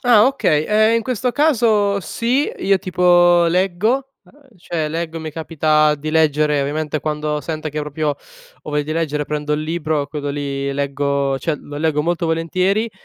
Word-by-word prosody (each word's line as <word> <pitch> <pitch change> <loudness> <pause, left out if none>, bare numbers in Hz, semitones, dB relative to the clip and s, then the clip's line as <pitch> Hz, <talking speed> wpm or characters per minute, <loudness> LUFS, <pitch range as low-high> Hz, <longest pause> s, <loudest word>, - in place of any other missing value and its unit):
Ah, 235 -3 +5
okay. 155 - +1
Ehm, 215 +2 +3
in 230 - 0
questo 250 +1 -1
caso 220 -9 +2
sì. 245 - -1
Io, 195 0 +2
tipo, 175 -2 +4
leggo, 195 +10 0
uhm, 275 -7 -23
cioè 165 -3 -3
leggo, 165 +1 -4
mi 160 0 -5
capita 155 -1 +1
di 150 +1 -5
leggere. 150 -2 +2
Ovviamente, 150 +2 -2
quando 150 -1 -2
sento 155 0 -4
che 150 - -5
proprio 150 +1 -3
ho - - -12
voglia 150 0 0
di 155 +2 -4
leggere 150 -2 -1
prendo 150 0 -3
il 150 +1 -1
libro, 155 -2 -2
quello 145 -2 -4
lì 140 -1 -3
leggo 140 0 -1
cioè, 160 +3 -1
lo 145 +1 -10
leggo 150 -1 0
molto 170 +1 -1
volentieri, 185 +7 0
160 Hz, 170 wpm, -19 LUFS, 150-200 Hz, -, Ah